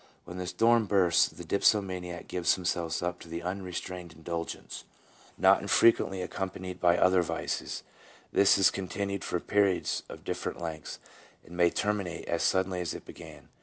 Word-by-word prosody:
4 85 Hz, -, -10 dB
When -, -, -8 dB
the 90 Hz, -, -4 dB
storm 115 Hz, +2 st, +3 dB
bursts 90 Hz, -4 st, +4 dB
the 85 Hz, -, -10 dB
dipsomaniac 90 Hz, -1 st, 0 dB
gives 90 Hz, -2 st, +1 dB
himself 85 Hz, -2 st, -2 dB
up 90 Hz, 0 st, -2 dB
to 85 Hz, 0 st, -6 dB
unrestrained 90 Hz, -1 st, -5 dB
in 80 Hz, -, -17 dB
dulgence, 85 Hz, 0 st, -5 dB, 0.5 s
not -, -, +5 dB
infrequently 95 Hz, -5 st, +3 dB
accompanied 95 Hz, 0 st, -5 dB
by 85 Hz, -1 st, +4 dB
other 95 Hz, 0 st, +4 dB
vices; 85 Hz, -, -3 dB, 0.5 s
this 100 Hz, 0 st, +5 dB
is 95 Hz, -, +5 dB
continued 100 Hz, +1 st, -3 dB
for 90 Hz, -, -1 dB
periods 100 Hz, 0 st, +1 dB
of -, -, -10 dB
different -, -, -4 dB
lengths, 80 Hz, -3 st, -6 dB, 0.5 s
and 85 Hz, -, -12 dB
may 85 Hz, 0 st, +4 dB
terminate 100 Hz, -2 st, -2 dB
as 85 Hz, -, -1 dB
suddenly 95 Hz, -1 st, +1 dB
as 90 Hz, -, -3 dB
it -, -, -9 dB
began. -, -, -12 dB
90 Hz, 160 wpm, -29 LUFS, 85-95 Hz, 0.5 s, not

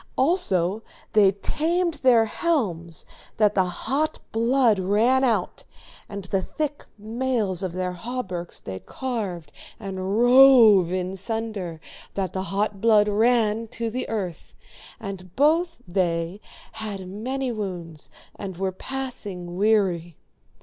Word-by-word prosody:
Also 210 Hz, -, +2 dB, 0.3 s
they 205 Hz, -3 st, +6 dB
tamed 335 Hz, -, 0 dB
their 240 Hz, -4 st, +5 dB
helms 195 Hz, -, -1 dB, 0.3 s
that 210 Hz, -2 st, +4 dB
the 190 Hz, -2 st, +3 dB
hot 270 Hz, -, -1 dB
blood 230 Hz, -1 st, +3 dB
ran 220 Hz, +8 st, +3 dB
out, 240 Hz, -4 st, 0 dB, 0.5 s
and 200 Hz, -1 st, -6 dB
the 190 Hz, +1 st, -1 dB
thick 295 Hz, +6 st, -4 dB
mails 220 Hz, -3 st, -1 dB
of 185 Hz, -3 st, -3 dB
their 185 Hz, 0 st, -2 dB
hauberks 185 Hz, -5 st, -5 dB
they 95 Hz, -1 st, -7 dB
carved 200 Hz, -, -5 dB, 0.3 s
and 195 Hz, -1 st, -3 dB
rove 240 Hz, -7 st, +7 dB
in 185 Hz, +1 st, -2 dB
sunder 200 Hz, -4 st, -4 dB, 0.4 s
that 190 Hz, -3 st, -2 dB
the 190 Hz, 0 st, -3 dB
hot 200 Hz, 0 st, -1 dB
blood 215 Hz, -2 st, +5 dB
ran 225 Hz, +1 st, +2 dB
to 230 Hz, +1 st, -4 dB
the 255 Hz, +3 st, -4 dB
earth, 190 Hz, -7 st, -5 dB, 0.4 s
and 185 Hz, -3 st, -8 dB
both 330 Hz, +4 st, +2 dB
they 175 Hz, +1 st, -1 dB, 0.3 s
had 200 Hz, -4 st, -6 dB
many 250 Hz, +7 st, -3 dB
wounds 175 Hz, -8 st, -6 dB, 0.3 s
and 190 Hz, -4 st, -7 dB
were 190 Hz, 0 st, -1 dB
passing 200 Hz, -7 st, -6 dB
weary. 185 Hz, -5 st, +1 dB
210 Hz, 120 wpm, -24 LUFS, 185-245 Hz, 0.5 s, rove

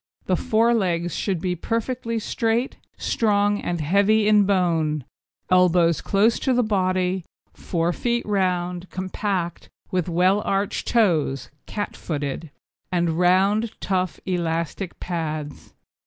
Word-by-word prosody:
The 185 Hz, -, +2 dB
fore 225 Hz, +5 st, +2 dB
legs 175 Hz, -5 st, 0 dB
should 190 Hz, -4 st, -1 dB
be 180 Hz, +1 st, -1 dB
perfectly 230 Hz, +4 st, -2 dB
straight, 230 Hz, +3 st, -1 dB, 0.2 s
strong, 205 Hz, -2 st, +1 dB
and 175 Hz, -1 st, -2 dB
heavy 200 Hz, +7 st, +3 dB
in 210 Hz, -1 st, +5 dB
bone; 165 Hz, -6 st, +1 dB, 0.5 s
elbows 175 Hz, -3 st, +4 dB
close 210 Hz, +4 st, +2 dB
to 260 Hz, -, +1 dB
the 245 Hz, -, +3 dB
body; 185 Hz, -3 st, 0 dB, 0.3 s
fore 170 Hz, 0 st, -1 dB
feet 240 Hz, +3 st, -1 dB
round, 180 Hz, -3 st, -1 dB
compact 185 Hz, -1 st, -3 dB, 0.2 s
with 180 Hz, -2 st, 0 dB
well 185 Hz, +4 st, +3 dB
arched 195 Hz, -1 st, -1 dB
toes 155 Hz, -, +1 dB, 0.2 s
(cat 205 Hz, -1 st, -4 dB
footed), 145 Hz, 0 st, -4 dB, 0.4 s
and 170 Hz, -2 st, 0 dB
round, 195 Hz, +5 st, +2 dB
tough, 185 Hz, -5 st, -1 dB
elastic 170 Hz, 0 st, -2 dB
pads. 155 Hz, -4 st, -5 dB
185 Hz, 120 wpm, -23 LUFS, 170-210 Hz, 0.5 s, in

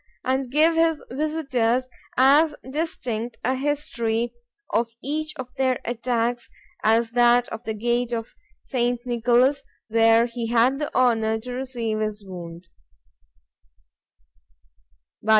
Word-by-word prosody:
and 265 Hz, 0 st, 0 dB
give 310 Hz, +5 st, +4 dB
his 325 Hz, -2 st, +2 dB
visitors 260 Hz, -4 st, 0 dB, 0.3 s
as 290 Hz, +4 st, +5 dB, 0.2 s
distinct 245 Hz, -7 st, -3 dB
a 255 Hz, -, +1 dB
history 240 Hz, -5 st, -1 dB, 0.4 s
of 230 Hz, 0 st, 0 dB
each 310 Hz, +3 st, -2 dB
of 255 Hz, -3 st, -8 dB
their 260 Hz, -1 st, +1 dB
attacks, 240 Hz, 0 st, -1 dB, 0.3 s
as 225 Hz, +1 st, +3 dB
of -, -, -29 dB
that 240 Hz, 0 st, +4 dB
of 225 Hz, -, -7 dB
the 220 Hz, -, -2 dB
gate 240 Hz, +2 st, 0 dB
of 230 Hz, -1 st, -4 dB, 0.3 s
St. 245 Hz, -2 st, 0 dB
Nicolas, 245 Hz, +3 st, +2 dB, 0.3 s
where 225 Hz, +1 st, +5 dB
he 235 Hz, -1 st, -4 dB
had 240 Hz, +4 st, +3 dB
the 300 Hz, -, -2 dB
honour 225 Hz, -3 st, +2 dB
to 250 Hz, +2 st, -6 dB
receive 245 Hz, -4 st, -3 dB
his 215 Hz, -1 st, -3 dB
wound. 175 Hz, -2 st, -9 dB
245 Hz, 120 wpm, -24 LUFS, 230-265 Hz, 0.4 s, as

